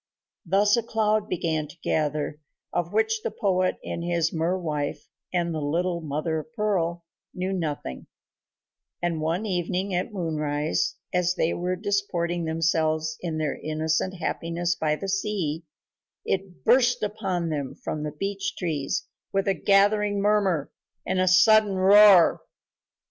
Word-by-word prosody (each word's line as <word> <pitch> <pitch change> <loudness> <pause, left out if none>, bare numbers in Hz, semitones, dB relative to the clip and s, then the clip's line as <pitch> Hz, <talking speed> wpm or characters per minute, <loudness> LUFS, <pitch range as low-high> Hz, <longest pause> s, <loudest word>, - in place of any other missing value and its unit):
Thus 200 +3 +4
a - - +2
cloud 215 -2 0
began 160 -3 -1
to 170 - -15
gather 150 -1 -1 0.3
of 175 0 -1
which 220 +1 +1
the - - -2
poet 185 -2 0
and 170 - -4
his 170 -1 0
mer 170 +3 0
wife 150 -5 -3 0.2
and 170 -2 0
little 170 +4 -1
Mother 155 +1 -2
of 155 - -10
Pearl 175 -6 -1 0.3
knew 185 +1 -2
nothing, 150 - -4 0.9
and 170 -2 -1
one 165 +7 -1
evening 185 0 -1
at 180 +5 -1
moonrise, 155 -5 -1 0.2
as 180 0 +1
they 165 -2 +1
were 180 +1 -1
disporting 175 -4 -1
themselves 160 -1 0
in 165 -3 -3
their 155 -2 -2
innocent 160 +4 -1
happiness 170 0 -2
by 155 -3 0
the 195 - -6
sea, 190 -5 -2 0.6
it 190 -2 -3
burst 245 0 +4
upon 195 -5 -2
them 145 -4 -3
from 155 - -5
the 150 0 -3
beech 195 +5 -3
trees 155 -6 -2 0.3
with 195 +1 0
a 195 - +4
gathering 205 +1 +3
murmur 200 -7 +1 0.3
and 185 - 0
a 185 - +2
sudden 200 +2 +5
roar. 195 -1 +7
175 Hz, 140 wpm, -25 LUFS, 160-195 Hz, 0.9 s, roar